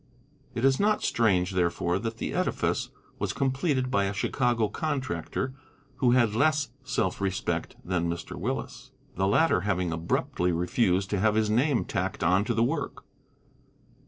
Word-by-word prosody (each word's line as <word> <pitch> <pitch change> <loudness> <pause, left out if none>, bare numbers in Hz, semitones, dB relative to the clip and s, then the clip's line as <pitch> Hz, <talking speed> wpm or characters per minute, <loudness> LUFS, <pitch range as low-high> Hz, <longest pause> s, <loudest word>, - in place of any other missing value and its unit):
It 120 - 0
is 135 -1 +4
not 210 +1 +2
strange, 95 -5 +2
therefore, 90 0 0
that 115 0 -4
the - - -3
edifice - - 0 0.3
was - - -1
completed 135 -1 0
by 100 -5 +2
a 100 - -1
Chicago 120 +1 +1
contractor 130 0 -3 0.4
who 130 -2 +3
had 120 -4 +3
less 145 +3 +2
self 105 -8 -1
respect 95 -1 -2
than 85 -2 0
Mr. 85 0 -5
Willis, - - -4 0.2
the 95 +1 0
latter 155 - +3
having 90 -3 0
abruptly 85 +2 0
refused 90 +2 +1
to 100 - +1
have 110 +2 +3
his 110 -1 +2
name 125 +3 +2
tacked - - -2
on 90 +3 +3
to 120 -1 -1
the 115 - +3
work. - - -2
110 Hz, 155 wpm, -27 LUFS, 90-130 Hz, 0.4 s, is